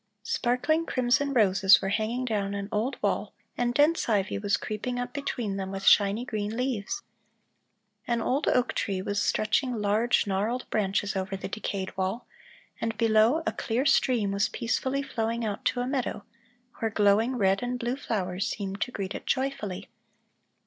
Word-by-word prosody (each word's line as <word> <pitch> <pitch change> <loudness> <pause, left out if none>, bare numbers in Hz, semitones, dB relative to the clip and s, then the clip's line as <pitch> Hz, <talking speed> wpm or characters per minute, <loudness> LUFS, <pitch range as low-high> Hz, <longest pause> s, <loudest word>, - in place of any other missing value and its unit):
Sparkling 300 +7 0
crimson 255 +3 +1
roses 200 -5 +5
were 195 - -2
hanging 225 +5 -1
down 200 -4 -1
an 200 0 -4
old 225 +6 -1
wall - - -1 0.2
and 240 0 0
dense 290 +3 +2
ivy 200 -2 +1
was 200 -1 +1
creeping 230 +4 -4
up 245 0 -4
between 240 -8 -3
them 190 -1 -3
with 195 0 -5
shiny 205 +4 +5
green 215 -2 -3
leaves. 255 - -2 1.0
An 235 -1 +1
old 265 +6 0
oak 250 0 +2
tree 195 -2 -1
was 205 +1 -1
stretching 245 +4 +1
large 215 +3 +2
gnarled 210 +6 -1
branches 200 0 0
over 190 +1 -2
the - - -5
decayed 195 -1 -4
wall, 190 +5 -2 0.6
and 225 -1 -2
below, 225 +7 +4
a - - +1
clear 245 +4 -1
stream 240 -7 +3
was 200 +2 +1
peacefully 260 +4 -1
flowing 230 -2 -2
out 205 -2 -3
to 245 - +1
a 245 - -2
meadow, 260 -6 -2 0.5
where 225 - 0
glowing 215 +4 +3
red 195 -4 +2
and 245 0 -2
blue 240 +1 -2
flowers 195 -8 -2
seemed 195 -1 -4
to - - 0
greet 200 -5 -4
it - - -8
joyfully. 260 -8 -2
220 Hz, 165 wpm, -27 LUFS, 200-250 Hz, 1.0 s, roses